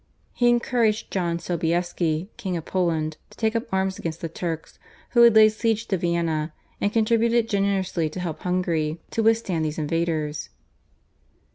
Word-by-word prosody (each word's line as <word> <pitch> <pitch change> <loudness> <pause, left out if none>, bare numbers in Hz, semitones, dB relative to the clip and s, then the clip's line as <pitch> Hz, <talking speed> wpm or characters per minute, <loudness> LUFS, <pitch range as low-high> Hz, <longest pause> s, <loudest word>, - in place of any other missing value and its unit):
He 240 -1 +3
encouraged 235 -2 +1
John 170 -3 0
Sobieski, 170 0 -1
King 190 -7 -3
of 160 - -7
Poland, 160 -4 -1
to - - -18
take 220 0 0
up 230 - -2
arms 190 0 0
against 165 0 -4
the 165 - -4
Turks 165 -1 -5 0.3
who 240 - +5
had 235 -2 +7
laid 215 0 +8
siege 225 +1 -1
to 195 - +2
Vienna, 170 -3 -1 0.3
and 205 - +1
contributed 230 +1 +2
generously 195 -5 0
to 170 - -7
help 170 -4 -4
Hungary 170 -3 -1
to 225 - 0
withstand 220 -7 +2
these 155 -1 -2
invaders. 155 -1 -1
180 Hz, 155 wpm, -24 LUFS, 165-220 Hz, 0.3 s, laid